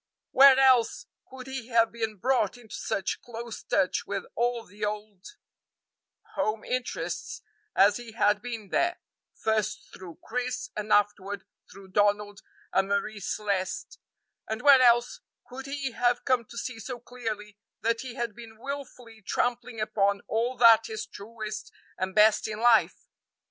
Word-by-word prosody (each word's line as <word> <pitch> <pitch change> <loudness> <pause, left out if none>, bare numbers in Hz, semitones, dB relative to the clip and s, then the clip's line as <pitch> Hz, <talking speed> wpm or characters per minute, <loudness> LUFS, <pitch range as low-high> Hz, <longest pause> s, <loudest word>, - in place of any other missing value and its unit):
Where 270 0 +8
else 265 - +4 0.2
could 260 -1 -10
he 265 -3 -6
have 230 -2 +3
been 225 -2 -3
brought 245 0 +1
into 225 -3 -14
such 195 - -2
close 235 -1 -7
touch 185 -2 0
with 200 -2 -3
all 240 -1 -1
the 205 +3 -11
old 210 -2 -4 1.1
home 215 0 -1
interests 255 0 -4 0.3
as 200 +1 +5
he 240 -2 -10
had 210 -2 +2
been 230 -5 -6
there, 350 - +1 0.4
first 220 -2 -1
through 175 -3 -10
Chris 250 0 -3
and 210 0 -4
afterward 205 -1 +1 0.3
through 195 0 -13
Donald 205 +1 +1 0.3
and 190 0 +3
Marie 205 +1 -1
Celeste, 195 -1 -3 0.5
and 220 0 -3
where 280 -3 +8
else 240 0 +4 0.3
could 265 +2 -8
he 275 -1 -3
have 245 +1 +1
come 255 -4 +2
to 235 - -12
see 240 -1 -5
so 240 +3 -6
clearly 215 -4 -6 0.2
that 230 0 0
he 255 -2 -7
had 235 -4 -3
been 225 -2 -12
wilfully 250 -3 -8
trampling 245 +2 -2
upon 200 -2 +1
all 235 +3 -1
that 230 -1 +7
is 220 -1 -4
truest 215 0 -7 0.3
and 185 0 -2
best 215 0 +5
in 215 0 -5
life? 235 -1 +3
225 Hz, 150 wpm, -28 LUFS, 210-245 Hz, 1.1 s, Where